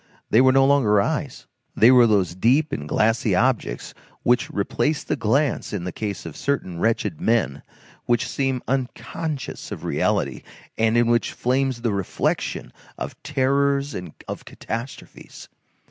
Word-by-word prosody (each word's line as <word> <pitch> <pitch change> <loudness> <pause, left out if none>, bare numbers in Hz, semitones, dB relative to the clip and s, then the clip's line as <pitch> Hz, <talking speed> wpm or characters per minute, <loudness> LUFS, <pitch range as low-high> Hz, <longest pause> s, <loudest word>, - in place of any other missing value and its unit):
They 115 - +6
were 130 0 +6
no 135 0 +5
longer 130 -7 +4
eyes; 150 +3 -2 0.3
they 115 +3 +6
were 125 -2 +7
those 95 -6 +2
deep 130 - +2
and 75 +1 -4
glassy 110 -2 +2
objects 110 - 0 0.3
which 120 +1 +2
replace 150 +9 -1
the - - -1
glance 135 +4 0
in 95 -4 -3
the 90 - -4
case 105 0 -5
of 80 - -7
certain 95 -12 -2
wretched 105 -5 0
men, 110 -12 +1 0.4
which 120 -1 +1
seem 135 -2 -1
unconscious 135 +3 -4
of - - -6
reality, - - 0 0.3
and 115 +1 +2
in 120 - +4
which 120 0 +1
flames 130 -1 0
the 115 -4 +1
reflection 100 -2 -2 0.2
of - - -7
terrors 140 0 +1
and 90 -3 -7
of - - -6
catastrophes. 115 +4 -8
120 Hz, 145 wpm, -23 LUFS, 105-135 Hz, 0.4 s, were